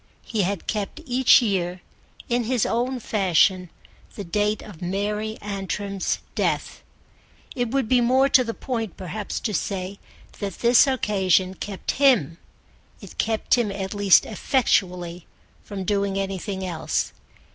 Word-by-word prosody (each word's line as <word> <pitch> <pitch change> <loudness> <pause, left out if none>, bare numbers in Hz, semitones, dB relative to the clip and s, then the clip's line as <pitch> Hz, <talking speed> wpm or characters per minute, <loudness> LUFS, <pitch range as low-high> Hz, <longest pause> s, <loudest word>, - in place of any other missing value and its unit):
He 220 -3 -1
had 195 0 -2
kept 210 +7 -3
each 255 -1 +5
year 185 -4 -1 0.5
in 240 -1 0
his 245 -1 +1
own 245 +3 -1
fashion 185 -4 +2 0.5
the 205 - -5
date 210 +4 0
of 200 -6 -12
Mary 210 +4 -2
Antrim's 200 -1 -3 0.2
death. - - -1 0.7
It 245 -2 -1
would 265 -1 0
be 250 +1 +4
more 260 +3 +4
to 265 -2 +5
the 230 -1 -4
point 225 -6 -4
perhaps 200 +3 -4
to 215 - -2
say 190 +2 -3 0.4
that 200 -3 -4
this 240 +3 +5
occasion 190 -7 +2
kept 195 0 -4
him: 200 - +4 0.6
it - - -13
kept 220 -1 0
him 220 -4 0
at 195 0 -4
least 205 -2 +5
effectually 180 - 0 0.4
from 200 -2 -6
doing 200 0 0
anything 195 0 -3
else. 170 -3 -2
205 Hz, 135 wpm, -24 LUFS, 190-230 Hz, 0.7 s, each